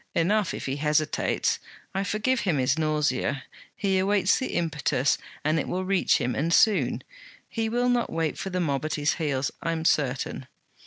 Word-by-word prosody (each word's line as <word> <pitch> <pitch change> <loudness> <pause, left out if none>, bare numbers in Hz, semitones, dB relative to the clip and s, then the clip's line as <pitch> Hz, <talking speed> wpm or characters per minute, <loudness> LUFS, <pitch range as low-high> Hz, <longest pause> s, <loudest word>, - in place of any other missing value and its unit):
'Enough 195 +3 +2
if - - -6
he 135 +1 -2
hesitates. 150 +1 +1 0.3
I 195 - 0
forgive 215 +5 0
him 180 -9 0
his 130 +1 +2
nausea. 150 -3 0 0.3
He 195 -2 +1
awaits 195 0 +3
the 260 - -2
impetus, 150 -5 +1 0.3
and 155 +2 +2
it - - -3
will 185 +1 -2
reach 195 -1 +3
him, 125 +1 -1
and 155 +8 -1
soon. 210 +4 +3 0.4
He 225 -1 -2
will 245 +2 +1
not 245 -1 +1
wait 165 -2 -1
for 195 - -4
the 180 -1 -2
mob 145 -5 0
at 155 - -1
his 150 0 +1
heels, 140 -3 0
I 165 - -1
am 160 0 -3
certain. 135 -3 0
160 Hz, 180 wpm, -26 LUFS, 145-195 Hz, 0.4 s, awaits